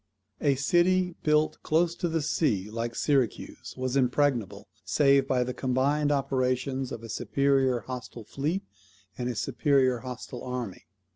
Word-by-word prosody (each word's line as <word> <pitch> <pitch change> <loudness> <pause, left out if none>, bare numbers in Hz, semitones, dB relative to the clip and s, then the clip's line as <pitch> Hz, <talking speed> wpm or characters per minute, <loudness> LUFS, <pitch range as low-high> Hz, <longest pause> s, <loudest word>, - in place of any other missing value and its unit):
A 140 -2 +3
city 180 +6 +2
built, 150 0 +2
close 165 +2 +2
to 175 - -1
the 160 -2 -1
sea, 105 - 0
like 115 +1 -3
Syracuse, 135 -7 -1
was 130 0 -2
impregnable, 130 -4 +1 0.2
save 140 -2 +3
by 125 -2 +2
the 125 +1 -4
combined 140 +4 +1
operations 130 -1 0
of 115 - -6
a - - -7
superior 135 +2 +1
hostile 125 -1 -7
fleet 150 - -2 0.5
and 125 0 -3
a 120 - -3
superior 130 0 +2
hostile 125 0 -7
army. 125 -9 -5
130 Hz, 140 wpm, -28 LUFS, 125-145 Hz, 0.5 s, A